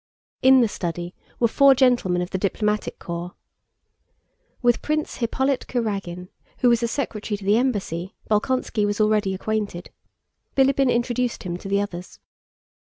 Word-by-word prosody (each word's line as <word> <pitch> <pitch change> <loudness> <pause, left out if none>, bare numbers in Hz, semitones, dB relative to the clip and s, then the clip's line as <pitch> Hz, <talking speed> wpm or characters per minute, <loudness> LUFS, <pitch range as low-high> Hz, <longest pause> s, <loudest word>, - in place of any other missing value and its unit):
In 260 0 +7
the 235 - +4
study 175 -2 -4 0.3
were 235 - +4
four 275 +3 +5
gentlemen 240 -9 +2
of 180 - -7
the 190 - -2
diplomatic 210 +2 -1
corps. 170 0 -6 1.3
With 240 -1 +3
Prince 305 0 -2
Hippolyte 265 +3 0
Kurágin, 195 -7 -3 0.3
who 245 - +5
was 235 -1 +3
a 235 - +1
secretary 225 -5 -3
to 200 - -11
the 205 +2 +4
embassy, 195 -8 -2
Bolkónski 220 0 0
was 205 +1 -2
already 215 -2 +2
acquainted. 205 -3 -3 0.7
Bilíbin 270 -1 +4
introduced 240 0 -1
him 175 -2 -4
to 195 - -8
the 200 0 +2
others. 180 -3 -6
215 Hz, 145 wpm, -23 LUFS, 190-245 Hz, 1.3 s, In